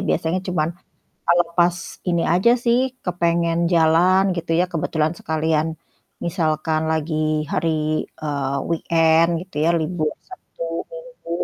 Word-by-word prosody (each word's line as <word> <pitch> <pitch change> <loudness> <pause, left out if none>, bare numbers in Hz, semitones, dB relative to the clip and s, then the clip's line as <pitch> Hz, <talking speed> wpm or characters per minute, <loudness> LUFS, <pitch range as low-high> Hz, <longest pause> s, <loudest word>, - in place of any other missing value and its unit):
biasanya 165 +3 0
cuman 155 -3 0 0.6
ngelepas 175 0 +3 0.3
ini 170 -1 +1
aja 190 +6 +4
sih, 235 +1 +4 0.3
kepengen 170 -1 0
jalan 170 +3 +4
gitu 170 - -5
ya - - +4
kebetulan 160 -1 0
sekalian, 160 0 0 0.6
misalkan 155 -2 0
lagi 160 0 -2 0.4
hari, 165 +1 +1 0.5
eee, 140 -2 -2
weekend 165 0 +3
gitu 185 -4 -16
ya 170 - +4
libur 155 -1 -1 0.2
Sabtu 370 - -11 0.3
Minggu. - - -11
165 Hz, 115 wpm, -21 LUFS, 160-175 Hz, 0.6 s, aja